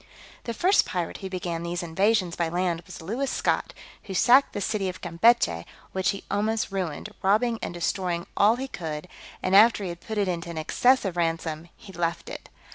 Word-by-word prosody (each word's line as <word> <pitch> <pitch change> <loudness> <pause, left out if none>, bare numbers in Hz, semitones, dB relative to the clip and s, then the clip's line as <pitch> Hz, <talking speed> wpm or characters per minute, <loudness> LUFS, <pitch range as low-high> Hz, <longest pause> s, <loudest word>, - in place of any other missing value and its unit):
The 235 - -3
first 375 - +4
pirate 175 -2 -3
who 190 - -6
began 175 -3 -3
these 175 +1 -3
invasions 185 +2 +1
by 170 -1 0
land 175 -1 -1
was - - -9
Lewis 245 +10 -2
Scot, - - 0 0.3
who 190 - -6
sacked 255 +8 +5
the - - -3
city 200 -1 -1
of 185 - -7
Campechy, 170 - +3 0.3
which 190 -1 0
he 200 - -3
almost 215 +1 0
ruined, 190 0 -3
robbing 220 +4 +2
and - - -3
destroying 175 0 -2
all 210 +3 +5
he 265 +2 -4
could; 160 -7 -6 0.4
and 185 +1 +2
after 215 0 +6
he 185 - -3
had 170 0 -7
put 220 - -6
it 205 - +2
to 175 -2 -3
an 170 - -6
excessive 195 +3 +2
ransom, 165 -1 -2
he 195 - -13
left 170 -1 -2
it. - - -8
185 Hz, 195 wpm, -26 LUFS, 170-215 Hz, 0.4 s, after